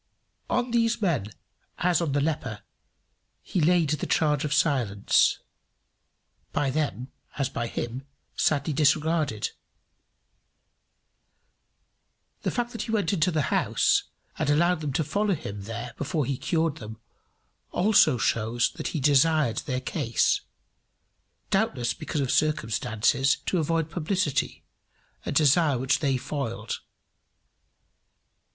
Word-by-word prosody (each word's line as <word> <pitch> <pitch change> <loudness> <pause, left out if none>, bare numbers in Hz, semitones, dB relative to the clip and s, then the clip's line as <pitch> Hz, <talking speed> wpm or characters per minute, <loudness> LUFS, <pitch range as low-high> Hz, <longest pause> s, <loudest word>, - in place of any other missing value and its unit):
On 250 -1 0
these 230 -1 +2
men, 170 - 0 0.5
as 175 -1 +2
on 155 -5 -1
the 145 - +2
leper, 140 -8 -2 0.8
he 180 - -1
laid 165 -1 +3
the 150 - -2
charge 150 -3 +2
of 150 - -2
silence, 130 -10 +2 1.1
by 135 -2 0
them, 135 -3 -2 0.3
as 140 -3 0
by 115 - -3
him, 125 +4 -5 0.3
sadly 150 0 +1
disregarded. 150 -5 +1 2.9
The - - -1
fact 240 -1 -2
that 230 - -5
he 225 - -4
went 205 -5 +1
into 175 -1 +2
the 155 -4 0
house, - - +2 0.3
and - - 0
allowed 170 +3 +3
them 150 -2 -2
to 160 +3 +1
follow 200 +6 0
him 100 -10 -7
there 115 +2 -6
before 150 0 -1
he 135 - -1
cured 160 +2 -1
them, 110 -3 -9 0.7
also 180 - +4
shows 115 0 +1
that - - -3
he - - -1
desired 145 -2 +3
in - - -10
their 130 -2 -2
case, 125 -4 +1 1.1
doubtless 150 - +1
because 150 - -3
of 135 - -1
circumstances, 125 -2 +1
to 185 - 0
avoid 165 0 0
publicity, 170 -3 -1 0.6
a - - -1
desire 150 0 +4
which 130 +2 +1
they 135 -3 +1
foiled. 125 -3 -4
150 Hz, 125 wpm, -26 LUFS, 130-165 Hz, 2.9 s, also